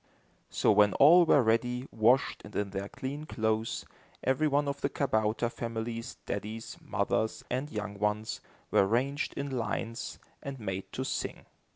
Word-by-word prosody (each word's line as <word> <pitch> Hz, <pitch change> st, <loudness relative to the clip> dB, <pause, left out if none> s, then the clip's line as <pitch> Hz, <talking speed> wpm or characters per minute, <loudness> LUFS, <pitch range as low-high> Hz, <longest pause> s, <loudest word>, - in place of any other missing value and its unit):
So -, -, +3 dB
when 105 Hz, -1 st, +5 dB
all 170 Hz, +5 st, +7 dB
were 145 Hz, -4 st, +6 dB
ready, 125 Hz, +3 st, +1 dB
washed, 115 Hz, +4 st, +3 dB
and 105 Hz, -, -11 dB
in 100 Hz, -1 st, -1 dB
their 100 Hz, +1 st, -4 dB
clean 145 Hz, +4 st, -5 dB
clothes, 110 Hz, -2 st, -1 dB, 0.4 s
every 135 Hz, +4 st, +2 dB
one 145 Hz, 0 st, +2 dB
of 140 Hz, 0 st, -3 dB
the -, -, +1 dB
kabouter 110 Hz, -3 st, +1 dB
families, 115 Hz, 0 st, -4 dB
daddies, 110 Hz, +3 st, -4 dB
mothers, 110 Hz, -, -1 dB
and 130 Hz, +4 st, -1 dB
young 105 Hz, -4 st, -5 dB
ones, 105 Hz, +1 st, -1 dB, 0.3 s
were 95 Hz, -, +5 dB
ranged 135 Hz, +7 st, 0 dB
in 140 Hz, 0 st, -3 dB
lines 115 Hz, -1 st, -3 dB, 0.2 s
and 140 Hz, -1 st, -6 dB
made 95 Hz, -3 st, -4 dB
to -, -, -2 dB
sing. -, -, -3 dB
115 Hz, 155 wpm, -30 LUFS, 105-135 Hz, 0.4 s, all